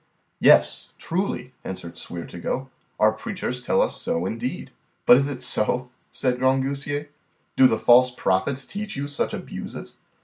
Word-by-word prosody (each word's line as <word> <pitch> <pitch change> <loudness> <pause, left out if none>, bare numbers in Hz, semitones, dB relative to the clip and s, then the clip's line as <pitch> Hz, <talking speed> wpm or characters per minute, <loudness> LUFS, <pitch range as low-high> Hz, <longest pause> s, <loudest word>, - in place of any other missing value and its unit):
Yes, - - +5
truly, 165 -8 -3
answered 85 -2 -7
Sweer 85 -1 -6
to 85 - -10
go, 130 +9 -3 0.3
our 110 0 +5
preachers 125 - -5
tell - - +3
us - - -3
so 85 +2 -1
indeed. 115 +6 -4 0.3
But 125 - +8
is 140 +1 +1
it 130 -3 -6
so, 125 +1 0 0.2
said 125 -2 -1
Grangousier, 140 +3 0 0.5
do 130 - +7
the 110 - +1
false 125 +3 +6
prophets 125 +4 0
teach 205 0 -6
you 140 +1 -3
such 145 - -2
abuses? - - -7
130 Hz, 150 wpm, -24 LUFS, 120-140 Hz, 0.5 s, But